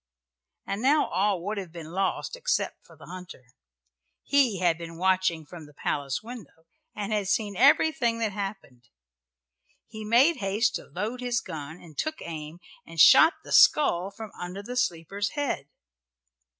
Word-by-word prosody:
And 200 Hz, +2 st, -3 dB
now 290 Hz, +4 st, +4 dB
all 190 Hz, 0 st, 0 dB
would 205 Hz, 0 st, -2 dB
have 185 Hz, -4 st, -8 dB
been 165 Hz, -2 st, -9 dB
lost 190 Hz, -, -2 dB
except -, -, -2 dB
for -, -, -18 dB
the -, -, -14 dB
hunter. 180 Hz, -7 st, -10 dB, 0.8 s
He 270 Hz, -8 st, +2 dB
had 175 Hz, -2 st, +2 dB
been 165 Hz, 0 st, -9 dB
watching 185 Hz, -3 st, +1 dB
from 160 Hz, 0 st, -11 dB
the 150 Hz, -, -19 dB
palace 140 Hz, +4 st, -2 dB
window 215 Hz, -, -11 dB, 0.3 s
and 210 Hz, 0 st, -3 dB
had 205 Hz, -2 st, -1 dB
seen 205 Hz, 0 st, 0 dB
everything 265 Hz, -1 st, +3 dB
that 225 Hz, -2 st, -1 dB
happened. 195 Hz, -, -7 dB, 1.0 s
He 220 Hz, -1 st, -9 dB
made 255 Hz, +9 st, +4 dB
haste 210 Hz, +1 st, 0 dB
to -, -, -12 dB
load 215 Hz, +7 st, -4 dB
his 245 Hz, -1 st, 0 dB
gun, 160 Hz, -1 st, -8 dB
and 160 Hz, -3 st, -15 dB
took 310 Hz, -, -2 dB
aim 155 Hz, -1 st, -7 dB, 0.3 s
and 165 Hz, 0 st, -10 dB
shot 320 Hz, -, +8 dB
the -, -, -11 dB
skull 190 Hz, -, +5 dB
from 215 Hz, +1 st, -9 dB
under 180 Hz, +3 st, -6 dB
the 245 Hz, +4 st, -6 dB
sleeper's 200 Hz, -3 st, -1 dB
head. 275 Hz, -, -3 dB
195 Hz, 160 wpm, -27 LUFS, 170-230 Hz, 1.0 s, shot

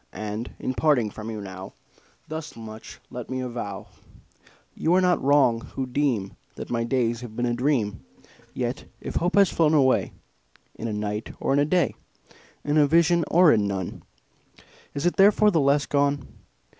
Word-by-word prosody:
And, 105 Hz, +3 st, -5 dB
in 130 Hz, -, -3 dB
parting 125 Hz, -3 st, +2 dB
from 110 Hz, +2 st, -7 dB
you 110 Hz, -2 st, -5 dB
now, 95 Hz, -1 st, -8 dB, 0.5 s
Thus 155 Hz, 0 st, -6 dB
much 110 Hz, -1 st, -10 dB
let 125 Hz, -2 st, -7 dB
me 130 Hz, -, -3 dB
avow 120 Hz, -6 st, -5 dB, 0.9 s
You 170 Hz, +3 st, +1 dB
are -, -, +5 dB
not 180 Hz, -1 st, +2 dB
wrong, 135 Hz, -5 st, +3 dB
who 135 Hz, -, -2 dB
deem 125 Hz, -7 st, -1 dB, 0.2 s
That -, -, -8 dB
my 115 Hz, -1 st, 0 dB
days 120 Hz, -1 st, 0 dB
have 115 Hz, -3 st, -9 dB
been 120 Hz, -, -1 dB
a 120 Hz, -, 0 dB
dream; 120 Hz, -5 st, 0 dB, 0.5 s
Yet -, -, -3 dB
if -, -, -4 dB
Hope 175 Hz, +1 st, 0 dB
has 200 Hz, -3 st, +5 dB
flown 160 Hz, -1 st, +3 dB
away 130 Hz, -3 st, +3 dB, 0.6 s
In 115 Hz, -, -6 dB
a -, -, -3 dB
night, 105 Hz, +1 st, -4 dB
or -, -, 0 dB
in 140 Hz, -, +3 dB
a 145 Hz, -, +3 dB
day, 170 Hz, -3 st, +1 dB, 0.7 s
In 150 Hz, +1 st, +2 dB
a 145 Hz, -, +5 dB
vision, 170 Hz, +2 st, +3 dB
or 175 Hz, -1 st, +6 dB
in 105 Hz, -3 st, +2 dB
none, 95 Hz, -2 st, -4 dB, 0.9 s
Is 140 Hz, +3 st, -2 dB
it 175 Hz, -, +1 dB
therefore 210 Hz, +2 st, +5 dB
the 165 Hz, -, +2 dB
less 140 Hz, +1 st, +3 dB
gone? 140 Hz, -1 st, 0 dB
130 Hz, 175 wpm, -25 LUFS, 110-150 Hz, 0.9 s, or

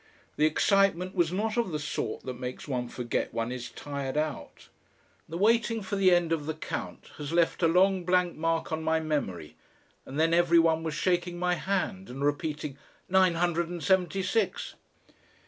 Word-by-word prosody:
The 150 Hz, -, +4 dB
excitement 185 Hz, +2 st, +2 dB
was 175 Hz, -3 st, +1 dB
not 215 Hz, +5 st, -1 dB
of 235 Hz, -5 st, +1 dB
the 155 Hz, -, -1 dB
sort 145 Hz, -6 st, -4 dB
that 125 Hz, -1 st, -6 dB
makes 125 Hz, 0 st, -6 dB
one 125 Hz, -3 st, -2 dB
forget 120 Hz, 0 st, -3 dB
one 115 Hz, +1 st, -1 dB
is 125 Hz, -1 st, -5 dB
tired 140 Hz, -1 st, -5 dB
out. 155 Hz, 0 st, -4 dB, 0.6 s
The 165 Hz, -, -4 dB
waiting 225 Hz, +2 st, +2 dB
for 195 Hz, -, -3 dB
the 195 Hz, -1 st, +4 dB
end 175 Hz, -2 st, +3 dB
of 155 Hz, -3 st, -1 dB
the 160 Hz, -, -2 dB
count 160 Hz, -, -6 dB
has 145 Hz, 0 st, -5 dB
left 170 Hz, +1 st, +2 dB
a 165 Hz, -, +5 dB
long 185 Hz, +2 st, +3 dB
blank 180 Hz, 0 st, +2 dB
mark 165 Hz, +1 st, -1 dB
on 160 Hz, 0 st, -1 dB
my 160 Hz, 0 st, +1 dB
memory, 140 Hz, -, -3 dB, 0.5 s
and 140 Hz, +3 st, -6 dB
then 165 Hz, +1 st, +3 dB
everyone 165 Hz, -1 st, +4 dB
was 160 Hz, -2 st, -3 dB
shaking 175 Hz, 0 st, 0 dB
my 180 Hz, 0 st, +1 dB
hand 190 Hz, +2 st, -2 dB
and 135 Hz, +3 st, -3 dB
repeating: 145 Hz, -1 st, -2 dB, 0.3 s
"Nine 185 Hz, -2 st, +4 dB
hundred 170 Hz, 0 st, 0 dB
and 175 Hz, -2 st, -6 dB
seventy 190 Hz, 0 st, +2 dB
six." 225 Hz, +5 st, -1 dB
165 Hz, 180 wpm, -28 LUFS, 150-185 Hz, 0.6 s, a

